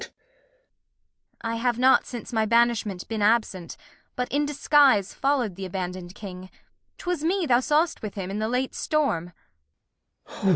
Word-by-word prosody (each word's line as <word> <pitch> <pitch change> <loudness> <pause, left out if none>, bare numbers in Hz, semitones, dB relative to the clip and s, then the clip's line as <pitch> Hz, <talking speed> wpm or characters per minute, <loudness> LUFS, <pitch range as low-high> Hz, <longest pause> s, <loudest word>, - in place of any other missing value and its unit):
I 230 0 -2
have 240 0 0
not 260 +2 +4
since 240 0 -7
my 220 -1 +1
Banishment 230 -5 +1
been 220 -2 -3
absent, 205 -5 +1 0.4
But 250 0 -3
in 290 +1 +1
Disguise 285 -7 +3
follow' 270 -3 +1
d 190 +1 -12
th' - - -3
abandon' 180 -1 -5
d 175 - -13
King: 185 -3 -9 0.5
'Twas 355 -4 -3
me 360 +2 +1
thou 245 -4 +4
saw'st 300 +5 +1
with 210 -2 -6
him 190 -2 -4
in 205 - -3
the 220 +1 -1
late 250 +2 -1
Storm. 275 - -1
230 Hz, 155 wpm, -25 LUFS, 195-275 Hz, 0.5 s, not